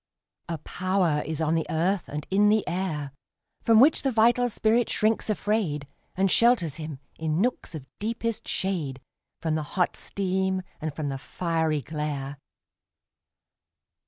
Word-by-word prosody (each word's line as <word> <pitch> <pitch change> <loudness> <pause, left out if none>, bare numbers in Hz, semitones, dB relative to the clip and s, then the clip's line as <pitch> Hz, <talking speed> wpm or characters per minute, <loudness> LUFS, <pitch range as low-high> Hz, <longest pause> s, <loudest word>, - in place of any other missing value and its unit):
A 165 - -2
power 180 -1 0
is 155 -1 -3
on 160 0 +1
the 165 -1 0
earth 175 +4 0
and 150 0 -4
in 205 +2 +5
the 215 0 +2
air 170 -6 -2 0.5
From 225 -1 +5
which 285 +5 +6
the 270 - +1
vital 240 +2 +4
spirit 225 +2 +2
shrinks 220 +1 +1
afraid, 205 -9 0 0.3
And 190 0 +2
shelters 215 - +4
him, 155 -3 -6 0.2
in 160 0 0
nooks 235 -6 -1
of 145 -4 -7
deepest 230 +1 -2
shade, 160 -9 -2 0.4
From 160 -2 0
the 155 - 0 0.2
hot 180 - +2
steam 190 -1 -1 0.2
and 155 0 -2
from 145 0 -3
the 135 -1 -4
fiery 160 -2 -1
glare. 145 -3 -4
180 Hz, 145 wpm, -26 LUFS, 155-210 Hz, 0.5 s, which